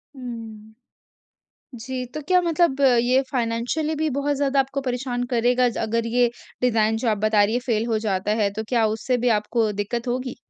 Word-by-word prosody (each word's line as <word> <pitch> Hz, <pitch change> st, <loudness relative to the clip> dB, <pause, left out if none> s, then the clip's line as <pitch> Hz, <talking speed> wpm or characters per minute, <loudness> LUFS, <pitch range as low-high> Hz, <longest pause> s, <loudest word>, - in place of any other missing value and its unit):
हुँ। 225 Hz, -4 st, -9 dB, 1.1 s
जी 255 Hz, +2 st, -4 dB
तो 305 Hz, -, -4 dB
क्या 365 Hz, 0 st, +5 dB
मतलब 335 Hz, -5 st, +1 dB, 0.2 s
ये 255 Hz, +2 st, +3 dB
फ़ाइनेंशियली 245 Hz, +6 st, -1 dB
भी 315 Hz, 0 st, +1 dB
बहुत 285 Hz, +1 st, 0 dB
ज़्यादा 275 Hz, -1 st, +1 dB
आपको 270 Hz, +1 st, -1 dB
परेशान 245 Hz, 0 st, -2 dB
करेगा 245 Hz, +1 st, +3 dB
ज 235 Hz, -, -7 dB
अगर 230 Hz, +1 st, -1 dB
ये 245 Hz, -1 st, +4 dB, 0.3 s
डिजाइन 225 Hz, -3 st, +2 dB
जो 235 Hz, -, +2 dB
आप 215 Hz, -, +1 dB
बता 215 Hz, 0 st, +3 dB
रही 210 Hz, +2 st, 0 dB
हैं 245 Hz, -, +1 dB
फेल 225 Hz, -2 st, 0 dB
हो -, -, +2 dB
जाता 195 Hz, +1 st, 0 dB
है 200 Hz, -, +2 dB
तो -, -, -2 dB
क्या 230 Hz, -2 st, +3 dB
उससे 250 Hz, +3 st, 0 dB
भी -, -, +4 dB
आपको 220 Hz, +1 st, 0 dB
दिक्कत 235 Hz, +4 st, -3 dB
होगी? 250 Hz, +1 st, -2 dB
245 Hz, 190 wpm, -23 LUFS, 220-265 Hz, 1.1 s, क्या